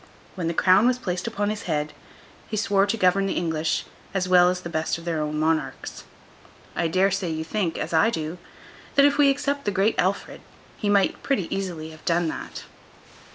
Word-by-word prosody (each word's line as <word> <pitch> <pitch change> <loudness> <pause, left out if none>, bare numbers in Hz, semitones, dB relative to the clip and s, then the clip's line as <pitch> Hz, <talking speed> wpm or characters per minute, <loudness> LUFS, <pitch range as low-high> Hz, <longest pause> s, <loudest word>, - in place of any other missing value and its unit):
When 180 -3 -3
the 165 - -2
crown 190 +7 +5
was 250 0 +2
placed 185 -4 -3
upon 205 -2 -1
his 215 - -4
head, 150 -1 -1 0.6
he 215 - -3
swore 200 -2 +2
to 225 - 0
govern 195 0 +3
the 190 - -2
English 160 -2 -1 0.3
as 185 -1 0
well 180 -1 +6
as 180 0 -2
the 175 - -6
best 160 -1 -1
of 165 - -11
their 165 -2 -1
own 150 0 -2
monarchs. 155 -4 -2 0.7
I 170 - +1
dare 185 +4 +2
say 190 -2 -1
you 160 0 -3
think, 170 0 -2
as - - -4
I 165 +8 +5
do, 160 -3 -4 0.6
that 280 - +6
if 285 0 +2
we 285 -1 +6
except 280 +1 -1
the - - 0
Great 205 +2 +2
Alfred, 190 +2 -1 0.3
he 210 - -2
might 200 -1 +2
pretty 200 -11 0
easily 170 -5 -4
have 155 0 -14
done 170 0 +1
that. - - -7
185 Hz, 200 wpm, -24 LUFS, 160-205 Hz, 0.7 s, well